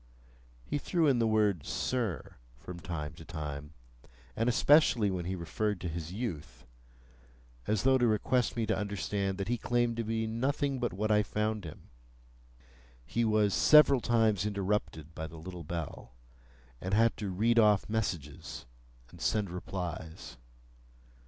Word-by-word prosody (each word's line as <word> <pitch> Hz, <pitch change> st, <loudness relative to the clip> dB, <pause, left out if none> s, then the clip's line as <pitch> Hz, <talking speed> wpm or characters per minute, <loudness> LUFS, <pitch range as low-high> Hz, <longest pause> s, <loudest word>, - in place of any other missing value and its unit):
He 145 Hz, -, -2 dB
threw 170 Hz, +2 st, +1 dB
in 135 Hz, -5 st, +3 dB
the 115 Hz, -, +3 dB
word, 105 Hz, -7 st, +2 dB
"Sir," 115 Hz, -, -2 dB, 0.2 s
from 85 Hz, +8 st, -9 dB
time 80 Hz, -4 st, -5 dB
to 80 Hz, -, -12 dB
time, 75 Hz, -2 st, -6 dB, 0.6 s
and 115 Hz, +2 st, +1 dB
especially 125 Hz, -5 st, +4 dB
when 90 Hz, -2 st, -3 dB
he 95 Hz, +2 st, -2 dB
referred 100 Hz, +4 st, -2 dB
to 90 Hz, -, -3 dB
his 80 Hz, 0 st, -5 dB
youth,—as -, -, -7 dB
though 130 Hz, 0 st, +4 dB
to 120 Hz, -, +3 dB
request 120 Hz, +3 st, +1 dB
me 115 Hz, -, +1 dB
to -, -, +1 dB
understand 100 Hz, -1 st, -2 dB
that 100 Hz, -1 st, -3 dB
he 120 Hz, +1 st, -1 dB
claimed 120 Hz, -1 st, 0 dB
to 115 Hz, -, -1 dB
be 110 Hz, 0 st, -1 dB
nothing 135 Hz, +4 st, -1 dB
but 120 Hz, -, -1 dB
what 105 Hz, +4 st, -1 dB
I 105 Hz, 0 st, +5 dB
found 105 Hz, -1 st, -2 dB
him. 75 Hz, -, -11 dB, 1.1 s
He 120 Hz, -, -1 dB
was 105 Hz, -2 st, +2 dB
several 150 Hz, -4 st, +6 dB
times 110 Hz, -5 st, +2 dB
interrupted 100 Hz, -6 st, -2 dB
by 80 Hz, 0 st, -5 dB
the 80 Hz, -, -11 dB
little 90 Hz, +1 st, -8 dB
bell, 80 Hz, -6 st, -6 dB, 0.7 s
and 95 Hz, +2 st, -1 dB
had 115 Hz, +1 st, +4 dB
to 105 Hz, -, -3 dB
read 115 Hz, +6 st, +2 dB
off 105 Hz, -3 st, +4 dB
messages, 85 Hz, -10 st, -4 dB, 0.5 s
and -, -, -14 dB
send 105 Hz, -4 st, 0 dB
replies. 90 Hz, -5 st, -6 dB
100 Hz, 150 wpm, -31 LUFS, 80-115 Hz, 1.1 s, several